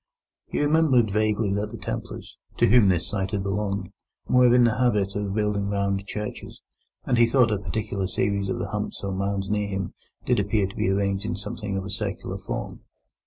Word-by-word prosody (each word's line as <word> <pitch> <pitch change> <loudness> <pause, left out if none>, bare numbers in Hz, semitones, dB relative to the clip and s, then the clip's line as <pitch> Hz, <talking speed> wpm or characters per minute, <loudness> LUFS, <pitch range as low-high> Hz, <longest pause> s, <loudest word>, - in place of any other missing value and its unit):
He - - -2
remembered 145 -7 +3
vaguely 105 -1 +1
that 105 +1 -1
the - - -8
Templars, - - -6 0.2
to - - +4
whom 110 -2 +6
this 90 -3 +1
site 95 -2 -2
had 100 -2 -2
belonged, 100 -1 -2 0.4
were 125 -1 +5
in 125 0 +6
the 115 0 +2
habit 105 -6 +2
of 100 -1 -2
building 105 -2 0
round 100 0 -1
churches, 105 0 -6 0.4
and 120 -3 +2
he 120 - +6
thought 120 -1 +4
a 105 - 0
particular 100 0 -2
series 100 +1 -1
of - - -1
the - - -3
humps - - -4
or 100 -1 -2
mounds 100 0 -1
near 105 0 0
him 95 -2 -3 0.3
did - - +2
appear 100 0 +1
to 95 - -7
be - - 0
arranged 100 0 0
in 95 - -2
something 100 0 -4
of 95 - -3
a 100 - -5
circular 100 -2 -4
form. - - -5
100 Hz, 200 wpm, -25 LUFS, 100-110 Hz, 0.4 s, whom